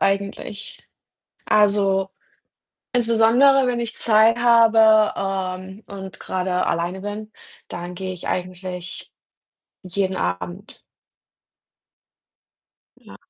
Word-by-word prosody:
eigentlich. 200 +1 -3 0.6
Also, 200 -2 +2 0.8
insbesondere, 245 +3 +4
wenn 245 -1 -1
ich 235 -1 -4
Zeit 220 +1 +4
habe, 225 -2 +5 0.5
ähm, 190 +3 -12
und 190 -1 -9
grade 185 0 -2
alleine 175 +3 -2
bin, 210 +2 -6 0.4
dann 175 +1 -7
gehe 190 +1 -5
ich 180 - -8
eigentlich 180 0 -5 0.7
jeden 185 +1 -2
Abend. 90 0 -5 2.2
Ja. - - -15
200 Hz, 85 wpm, -21 LUFS, 185-225 Hz, 2.2 s, habe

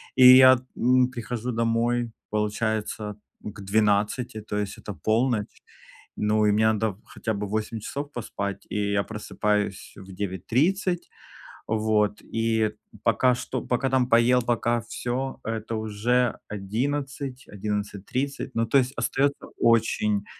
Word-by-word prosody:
И 130 0 +10
я, 130 -1 +8 0.2
м, 125 +1 +4
прихожу 120 0 -4
домой, 115 +1 0 0.2
получается, 105 0 -2 0.3
к 105 -1 -8
12, 105 +3 +1
то 105 0 -4
есть 105 -1 -3
это 105 - -7
полночь. 110 -1 0 0.5
Ну, 105 0 +2
и 105 - +4
мне 110 +1 +4
надо 105 -2 -1
хотя 110 -2 -4
бы 100 0 -3
8 110 +1 -2
часов 140 +6 -5
поспать. 100 -4 -5
И 100 -1 -1
я 100 - +2
просыпаюсь 105 -2 -2
в 95 -1 -11
9:30. 135 - 0 0.6
Вот, 110 -1 +1
и 115 0 -1
это 110 -1 0 0.3
пока 125 -1 +3
что 125 0 -4
пока 125 +2 0
там 130 -2 +3
поел, 120 +2 +5
пока 120 0 0
всё- 125 +3 -4
это 115 0 -3
уже 110 +3 0
11, 130 +6 -3
11:30. 105 +7 -3
Ну, 115 - +2
то 135 +5 +4
есть 130 +1 -1
остаётся 140 +1 0
очень 105 -3 +2
110 Hz, 130 wpm, -25 LUFS, 105-125 Hz, 0.6 s, И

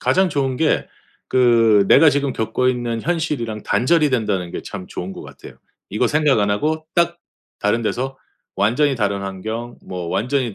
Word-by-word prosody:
가장 190 0 +2
좋은 135 -4 -1
게 160 +2 +1 0.4
그 115 -5 +4
내가 160 +3 +7
지금 140 -1 0
겪고 125 +3 0
있는 120 -2 -2
현실이랑 150 -11 -2
단절이 155 +2 +2
된다는 100 -8 -1
게 - - -5
참 95 -2 -8
좋은 90 +2 -6
것 - - -9
같아요. - - -13 0.3
이거 110 +5 +1
생각 150 -2 +2
안 105 -1 +1
하고 155 +9 -1
딱 170 0 +1 0.4
다른 105 +3 0
데서 130 +4 -2 0.4
완전히 125 +9 +2
다른 100 -4 -1
환경 110 +5 -5
뭐 90 -2 -6
완전히 125 +3 -1
120 Hz, 315 characters per minute, -20 LUFS, 105-145 Hz, 0.4 s, 내가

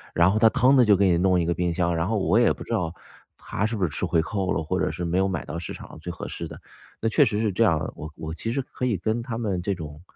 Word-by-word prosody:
然 85 +3 +5
后 110 - +1
他 115 0 +6
腾 130 +2 +4
地 130 - +6
就 105 -3 +5
给 95 -1 +3
你 85 - +3
弄 90 -1 +3
一 85 - 0
个 85 - +1
冰 90 0 -1
箱， 85 0 0
然 80 +2 0
后 110 - 0
我 100 +2 +3
也 120 - +4
不 - - -9
知 - - -10
道 90 -6 -1 0.4
他 100 - -3
是 110 +1 -1
不 100 - -2
是 85 - +2
吃 80 - -3
回 85 -2 +2
扣 95 +2 -2
了， 80 - -1
或 95 +4 -1
者 90 - +1
是 90 - -5
没 85 +1 0
有 95 +1 +3
买 95 - -3
到 85 +4 -5
市 85 - -6
场 - - -10
上 - - -12
最 - - -7
合 - - -7
适 - - -5
的。 - - -10 0.4
那 115 - +1
确 - - +4
实 105 +1 0
是 110 -2 +1
这 105 +5 +2
样 85 -7 +3
儿 80 - -3
的， - - -7
我 80 - -6
我 80 0 -6
其 115 +7 -3
实 135 - 0
可 125 - -5
以 115 -5 +1
跟 110 +6 -1
他 115 -2 -5
们 100 -6 -1
这 100 +2 -1
种， 75 -3 -8
95 Hz, 360 characters per minute, -25 LUFS, 85-110 Hz, 0.4 s, 他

